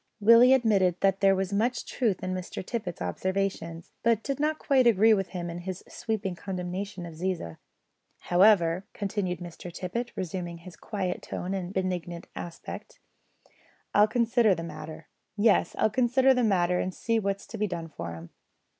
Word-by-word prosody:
Willie 230 +4 +7
admitted 195 -8 +2
that 195 0 +3
there 195 -1 +5
was 190 +1 -2
much 235 +4 0
truth 220 -9 -1
in 185 0 -2
Mr 185 0 -5
Tippet's 185 - -4
observations, 170 - -3
but 230 -2 +2
did 275 0 -3
not 305 +1 +1
quite 265 -5 +3
agree 220 0 +6
with 195 -3 0
him 175 -2 -5
in 170 0 -5
his 185 +1 -6
sweeping 215 -4 -3
condemnation 185 +1 -5
of 170 - -8
Ziza. 165 - -3 0.6
"However," 180 -2 +4
continued 195 -3 -2
Mr 175 0 -8
Tippet, 210 +8 -4
resuming 180 -3 -4
his 170 +1 -12
quiet 190 -4 -3
tone 185 +2 -4
and 185 -2 -3
benignant 180 -3 -3
aspect, 175 - -8 0.9
"I'll 210 +1 +6
consider 235 -3 +3
the 165 - -5
matter. 155 0 -8 0.3
Yes, 210 0 +3
I'll 220 - +2
consider 255 +3 +4
the 250 -1 +1
matter 180 -4 +2
and 185 - -1
see 230 -1 0
what's 200 -1 -2
to 225 - -8
be 210 - +1
done 170 -3 -5
for 85 - -6
'em." 85 0 -11
190 Hz, 165 wpm, -28 LUFS, 175-220 Hz, 0.9 s, Willie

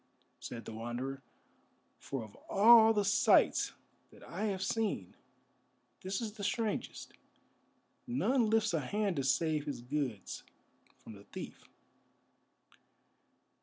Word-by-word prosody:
said 115 -1 -7
the - - -7
Wanderer, 120 +4 -5 0.8
"for 135 -4 -5
of 105 -2 -12 0.2
all 225 +2 +8
the 205 -2 +1
sights 205 +3 +4 0.4
that - - -16
I 215 - -4
have 195 -3 -1
seen, 210 - -2 0.9
this 190 +4 -3
is 220 -2 -3
the 210 -2 -8
strangest. 220 +1 -2 0.9
None 240 -1 +1
lifts 220 -4 +2
a 165 - +2
hand 200 +5 -1
to 135 - 0
save 150 +3 +1
his 140 -5 -5
goods 125 -6 -3 0.6
from 110 - -10
the 100 0 -14
thief." - - -9
170 Hz, 120 wpm, -33 LUFS, -, 0.9 s, all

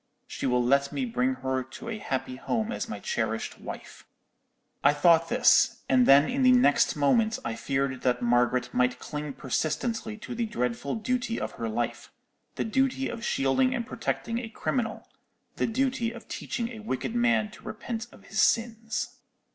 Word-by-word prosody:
She - - -4
will 125 -1 +2
let 140 +3 +2
me 265 - -1
bring 250 +2 0
her 130 0 +1
to 130 - -10
a 225 -2 -4
happy 130 -7 -3
home 220 - -2
as - - -4
my 105 - -5
cherished 115 +1 -2
wife.' - - -9 0.8
"I 145 - +6
thought 165 +2 +4
this, - - +4
and 130 -2 +4
then 140 +2 +7
in 270 +2 -1
the 255 -1 +6
next 245 - +4
moment 220 +10 +3
I 115 - -1
feared 135 +1 -1
that 125 -1 +1
Margaret 120 +1 +2
might 125 0 +2
cling 150 +1 -5
persistently 215 - -2
to 220 - -7
the 235 -1 -1
dreadful 125 - -2
duty 235 +1 -1
of - - -3
her 115 - -4
life—the 115 +1 -5
duty 265 +3 +1
of 230 - -6
shielding 240 - +2
and 235 -2 -2
protecting 230 +1 -2
a 235 -2 -6
criminal; 225 0 -2 0.5
the - - +1
duty 255 0 0
of 235 -1 -11
teaching 235 -2 -3
a 230 -3 -8
wicked 215 - -3
man 235 -3 +2
to - - -15
repent 230 0 -5
of - - -17
his - - 0
sins. 225 -1 0
215 Hz, 170 wpm, -27 LUFS, -, 0.8 s, then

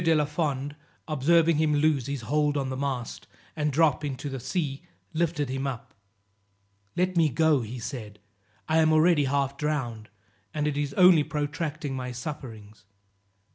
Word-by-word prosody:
de 165 -1 +4
la 150 -1 +3
Fond 145 -2 -2 0.3
observing 160 +2 +3
him 155 -1 +2
lose 145 -4 +2
his 140 -3 -3
hold 150 +5 +1
on 135 -2 -1
the - - -2
mast, 130 -3 -4 0.3
and 150 -1 0
drop 155 +1 +3
into 140 0 -4
the 135 -1 -5
sea, 145 0 -2 0.3
lifted 160 -3 0
him 135 +2 -2
up. 125 -4 -6 1.0
"Let 185 +1 +1
me 165 -3 +4
go," 145 -1 +3
said 110 -3 -6
he. - - -35 0.5
"I 160 - +2
am 160 0 +4
already 155 -1 +4
half 140 0 0
drowned, 125 -8 -2 0.5
and 150 -1 0
it 150 - -1
is 145 -1 -2
only 180 -4 +7
protracting 150 0 -3
my 125 -1 -4
sufferings." 115 -7 -8
145 Hz, 160 wpm, -27 LUFS, 130-155 Hz, 1.0 s, only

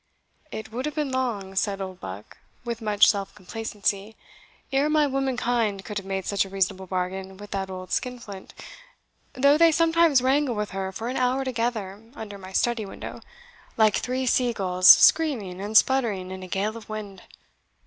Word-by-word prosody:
"It 220 0 -7
would 255 +5 -3
have 300 - -5
been 295 -3 -1
long," 230 -7 -2
said 195 +1 -1
Oldbuck, 105 - -8 0.3
with 235 -1 -4
much 210 -1 +4
self 200 -2 0
complacency, 210 +1 -3 0.6
"ere 275 +2 +2
my 305 -1 +3
womankind 245 -7 -1
could 205 +2 -4
have 195 - -12
made 190 -1 -3
such 200 -1 +1
a 195 - -9
reasonable 190 0 -1
bargain 190 +1 -4
with 205 0 -11
that 195 -1 -3
old 185 -1 -8
skin 250 -1 -1
flint, 200 -5 -10 0.8
though 280 +3 +4
they 335 0 +7
sometimes 330 -3 +4
wrangle 265 -1 +2
with 210 0 -3
her 190 0 -3
for 225 +4 -6
an 255 - -3
hour 255 +1 +1
together 230 -5 -2
under 205 -4 -8
my 190 0 -10
study 235 +2 +1
window, 195 - -8 0.6
like 215 -2 +4
three 255 +1 -2
sea 245 -1 +2
gulls 185 -3 +1
screaming 220 - +5
and 210 +2 +2
sputtering 215 -9 +2
in 190 0 -7
a 185 - -8
gale 200 +4 -2
of 225 -2 -11
wind. 205 -3 -7
215 Hz, 175 wpm, -25 LUFS, 195-255 Hz, 0.8 s, they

